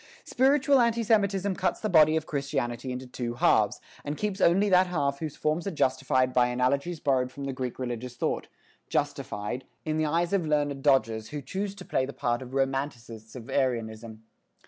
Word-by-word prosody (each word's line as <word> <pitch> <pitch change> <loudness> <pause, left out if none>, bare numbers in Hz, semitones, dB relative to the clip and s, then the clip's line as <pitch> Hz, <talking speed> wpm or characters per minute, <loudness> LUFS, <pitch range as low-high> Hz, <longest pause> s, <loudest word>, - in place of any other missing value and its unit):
Spiritual 275 +1 +3
anti 235 0 +2
Semitism 200 -3 +2
cuts 180 -1 -1
the 215 - -2
body 155 -4 +5
of 160 -1 -1
Christianity 135 -4 -3
into 125 +1 -5
two 120 -1 -5
halves, - - +3 0.2
and 145 +1 -4
keeps 205 -2 -2
only 190 +5 +4
that 185 -1 +5
half 140 -5 -1
whose 155 -3 -5
forms 155 +4 -1
are - - +1
justified 130 -5 +1
by 125 -1 +4
analogies 140 +7 0
borrowed 130 -3 +1
from 140 - -8
the 135 -1 -3
Greek 130 -2 -4
religious 125 -1 -5
thought, - - -2 0.4
justified, 105 +5 -2 0.2
in 155 0 -1
the 155 - +1
eyes 170 +4 0
of 195 -3 +2
learned 145 -2 0
dodgers 115 -6 +2
who 150 - -4
choose 190 +9 -4
to - - -10
play 130 - 0
the 140 - -7
part 120 -2 -1
of 130 +1 -8
Romanticists 135 -5 -3
of 120 -2 -9
Aryanism. 115 -4 -2
140 Hz, 185 wpm, -27 LUFS, 125-175 Hz, 0.4 s, body